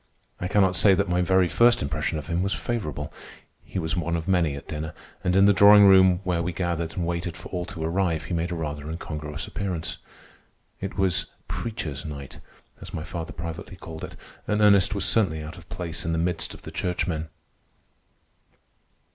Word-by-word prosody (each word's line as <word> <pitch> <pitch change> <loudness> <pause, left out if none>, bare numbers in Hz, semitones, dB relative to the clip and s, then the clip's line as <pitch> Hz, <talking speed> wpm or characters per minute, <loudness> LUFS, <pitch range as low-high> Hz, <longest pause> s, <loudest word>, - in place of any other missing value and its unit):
I 90 - -2
cannot 95 -2 +3
say 95 +3 +6
that 100 +1 0
my 90 0 +1
very 95 +1 +3
first 120 +4 +4
impression 75 +3 -1
of 75 - -5
him 85 +3 -1
was 100 +1 0
favorable. 75 - -3 0.5
He - - -7
was 80 -3 -1
one 85 -1 -1
of 80 -1 -3
many 85 -6 +2
at 70 - -9
dinner, 75 0 -5 0.3
and 90 -1 +1
in 95 +1 +6
the 100 - +6
drawing 100 +2 +8
room 95 -2 +6
where 90 -2 0
we 90 +1 -2
gathered 85 -2 -2
and 90 - -2
waited 85 0 -3
for - - -9
all 90 -1 -3
to 90 -4 -6
arrive, 85 -1 0
he 90 - -4
made 85 +1 -1
a - - -2
rather 75 -2 -4
incongruous 75 -1 -5
appearance. 85 -4 -4 0.8
It 95 0 -5
was 95 -3 +1 0.2
"preacher's 80 - -4
night," 70 -3 -8 0.4
as - - -8
my 80 - -3
father 85 0 -5
privately 80 +3 -7
called 80 -2 -9
it, - - -7 0.3
and 105 - +1
Ernest 100 -2 +5
was 100 -2 +1
certainly 85 -10 +2
out 80 +4 -8
of 85 - -17
place 85 -2 -4
in 80 - -1
the - - 0
midst 85 +2 -1
of - - -15
the - - -8
churchmen. 85 -3 -2
85 Hz, 195 wpm, -25 LUFS, 80-95 Hz, 0.8 s, drawing